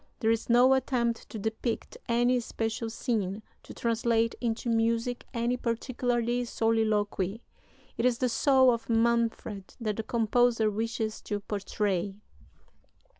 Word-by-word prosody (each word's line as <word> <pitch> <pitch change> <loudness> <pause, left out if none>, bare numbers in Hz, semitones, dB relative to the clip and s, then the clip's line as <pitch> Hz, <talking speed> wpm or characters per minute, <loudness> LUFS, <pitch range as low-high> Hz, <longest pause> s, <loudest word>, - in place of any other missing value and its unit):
There 225 - +2
is 230 +1 -1
no 245 +2 +6
attempt 245 -3 0
to - - -6
depict 220 +2 -3
any 240 +2 +3
special 225 0 -3
scene, 220 -3 -2 0.2
to - - -13
translate 230 0 +1
into 235 0 -2
music 230 +1 0
any 240 0 0
particular 240 0 -1 0.2
soliloquy. 220 -3 0 0.6
It 230 - +1
is 245 -2 +1
the 255 - +1
soul 260 +1 +4
of 230 0 -5
Manfred 230 -3 0
that 215 -3 -2
the - - 0
composer 230 -1 +2
wishes 220 0 -2
to 205 - -2
portray." 200 -2 -2
230 Hz, 125 wpm, -29 LUFS, 220-240 Hz, 0.6 s, no